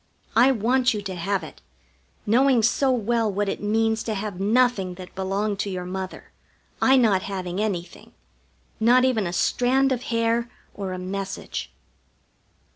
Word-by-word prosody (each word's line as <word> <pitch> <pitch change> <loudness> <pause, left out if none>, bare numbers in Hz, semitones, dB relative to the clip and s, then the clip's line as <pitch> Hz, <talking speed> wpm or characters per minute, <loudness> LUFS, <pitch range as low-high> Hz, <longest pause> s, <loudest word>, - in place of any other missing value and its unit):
I 260 +2 +6
want 245 +1 +2
you 205 - -4
to 195 -1 -5
have 185 +1 -2
it, 155 - -11 0.6
knowing 245 +2 +4
so 265 +4 +2
well 230 -2 +1
what 205 +1 -1
it - - -3
means 220 +1 +1
to 220 - -3
have 200 -2 -5
nothing 210 -3 +2
that 180 0 -11
belonged 195 +2 -2
to 205 - -1
your 180 -2 -4
mother, 185 +1 -6 0.5
I 265 0 +5
not 215 -7 +3
having 185 -1 -4
anything 185 -5 -4 0.7
not 245 +3 +5
even 225 -7 +1
a - - -3
strand 260 +8 +2
of 250 -2 0
hair 230 0 0 0.2
or 195 -2 -5
a - - -4
message. 190 - -5
210 Hz, 155 wpm, -24 LUFS, 190-240 Hz, 0.7 s, I